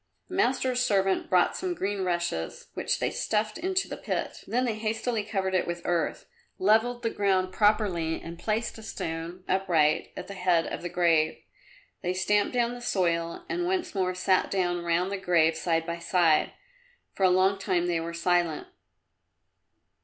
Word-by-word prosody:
The - - -9
master's 260 -8 +1
servant 195 -5 +1
brought 180 -1 +3
some 365 -1 -2
green 200 - -2
rushes 175 - -2
which - - -1
they - - -1
stuffed 215 +4 -1
into 375 +2 0
the - - -6
pit, - - -4
then 250 +3 +1
they 235 - 0
hastily 220 +1 -2
covered 195 -2 -2
it 185 - +1
with 175 0 -4
earth, 175 -2 -1 0.3
levelled 225 +5 +2
the 230 - 0
ground 190 -2 +1
properly 200 -7 +2
and 170 0 -9
placed 220 +1 -2
a - - -9
stone, 170 -3 -5
upright, 170 -5 +2
at 180 - -5
the 200 - -7
head 180 -3 +2
of - - -5
the 175 - -4
grave. 165 -3 +2 0.6
They 180 +1 -1
stamped 205 +5 +1
down 240 0 +1
the 245 - -8
soil 170 -6 -1
and 355 -1 -1
once 370 -1 -1
more 185 -2 0
sat 185 +1 +2
down 175 -2 0
round 170 +3 +1
the 200 - -1
grave 170 -4 +3
side 165 0 0
by 170 0 -4
side. 170 -3 +2 0.6
For - - -10
a 190 - +6
long 190 +2 +3
time 180 -3 0
they 175 -2 0
were 170 +1 -5
silent. 175 -2 +1
185 Hz, 175 wpm, -27 LUFS, 170-215 Hz, 0.6 s, a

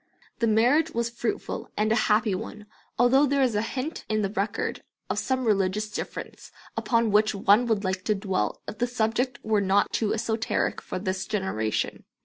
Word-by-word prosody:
The 230 - +2
marriage 245 +9 +4
was 235 0 0
fruitful 235 -1 -3
and 215 +1 +1
a - - +4
happy 215 0 +3
one, 210 +2 -6 0.3
although 265 +4 +5
there 280 0 +2
is 250 -3 +2
a 210 - +1
hint 260 +7 -4
in 215 -1 +1
the 195 - -1
record 205 0 -2 0.3
of - - 0
some 260 -1 -1
religious 210 0 +1
difference - - -6 0.2
upon 230 -2 +1
which 215 +1 +3
one 205 +5 +4
would 220 -3 +1
like 185 -1 -2
to 215 - +2
dwell 195 -2 -2
if 215 - -7
the 245 - +2
subject 240 +2 0
were 215 -2 +2
not 195 +1 +2
too 215 -2 +1
esoteric 220 0 -1
for - - -5
this 190 0 -3
generation. 190 - -2
215 Hz, 180 wpm, -26 LUFS, 200-235 Hz, 0.3 s, although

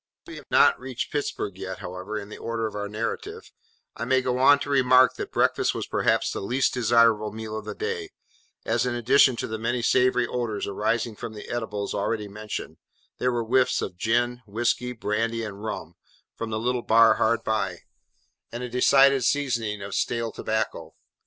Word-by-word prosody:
As - - -12
we - - -8
have - - -13
not - - +5
reached 130 -1 -5
Pittsburg 105 -9 -3
yet, 95 -1 -5
however, 95 +4 -6
in 100 -1 -7
the - - -9
order 115 -1 -3
of 110 - -4
our 105 0 -4
narrative, 115 - -5 0.4
I - - -5
may 130 0 +2
go 125 0 -1
on 145 +2 +7
to 145 - -4
remark 130 -1 +5
that - - -5
breakfast - - +1
was - - -3
perhaps - - +1
the - - -4
least 125 +7 0
desirable 115 -3 +3
meal 110 0 -6
of 110 - -6
the - - -6
day, 440 -2 -4 0.6
as - - +1
in 120 - -1
addition 130 +2 +4
to - - -3
the 110 0 -5
many 120 +2 -1
savoury 125 0 +3
odours 120 -4 -3
arising 110 +3 -1
from 110 - -7
the 105 - -8
eatables 105 -4 -4
already 105 +1 -2
mentioned, 105 +1 -7 0.4
there 125 - +1
were 120 -1 -1
whiffs 125 +3 +2
of - - -4
gin, 120 +5 0
whiskey, 120 +3 -1
brandy, 115 0 -2
and 100 -1 -7
rum, 110 - -5 0.4
from 115 - -5
the 110 - -2
little 120 +2 -1
bar 115 0 +5
hard 115 +1 +1
by, 100 -5 -1 0.7
and 120 +1 -5
a 125 - -4
decided 135 +2 +4
seasoning 115 -7 0
of 100 0 -7
stale 115 -1 -1
tobacco. 110 0 -3
115 Hz, 190 wpm, -25 LUFS, 110-125 Hz, 0.7 s, on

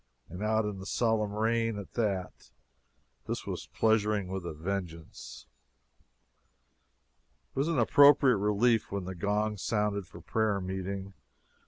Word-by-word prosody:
And 90 +3 -8
out 110 0 +1
in 105 -2 -4
the 95 - -8
solemn 110 -3 +1
rain, 115 +1 0
at 100 - -9
that. 100 -6 -2 0.8
This - - -3
was - - -5
pleasuring 105 -3 +1
with 95 -2 -4
a - - -3
vengeance. 80 -7 -6 2.1
It - - -2
was 140 - +1
an 165 -3 0
appropriate 140 0 +6
relief 105 +3 +2
when 100 -2 -3
the 95 - -5
gong 105 +4 -1
sounded 105 -1 -1
for - - -12
prayer 110 -3 0
meeting. 95 +1 -5
105 Hz, 135 wpm, -30 LUFS, 95-110 Hz, 2.1 s, appropriate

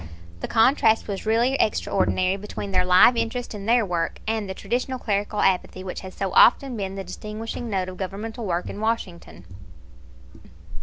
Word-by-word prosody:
The - - -4
contrast 225 -1 +3
was 200 +1 -5
really 235 +4 +2
extraordinary 190 -2 +1
between 200 0 -6
their 185 -1 +2
live 180 +7 +6
interest 230 +1 -3
in 205 -1 -7
their 235 -1 +4
work 170 -3 -2
and 220 -3 -1
the 190 - -4
traditional 250 +6 -2
clerical 205 -2 -1
apathy 185 0 0
which 185 - -5
has 185 -1 -10
so 195 -1 -2
often 260 +1 +5
been 195 -3 -4
the 195 - -5
distinguishing 215 +5 -6
note 190 -3 -1
of 185 0 -8
governmental 210 +4 -5
work 175 0 -1
in - - -7
Washington. 185 - -4
205 Hz, 165 wpm, -24 LUFS, 185-225 Hz, -, live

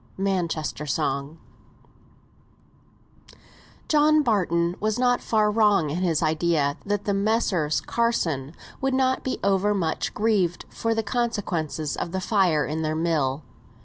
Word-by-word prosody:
'" - - -29
MANCHESTER 165 -5 -2
SONG. 140 +1 -2 2.5
John 305 0 +4
Barton 175 - +1
was 215 +1 0
not 245 -1 +2
far 215 -2 +2
wrong 205 -8 +3
in 155 - -2
his 170 -4 +1
idea 155 -2 +1
that 205 0 -2
the 205 - +1
Messrs. 195 -7 +1
Carson 165 - -1 0.3
would 270 0 +1
not 260 0 +1
be 260 - -2
over 200 +1 +2
much 165 -5 -2
grieved 200 -5 +1
for 230 0 -2
the 225 - 0
consequences 195 - -2
of 170 - -4
the 190 - -1
fire 185 -7 +2
in 155 +2 -3
their 155 0 -1
mill. 155 -4 0
185 Hz, 135 wpm, -24 LUFS, 155-220 Hz, 2.5 s, John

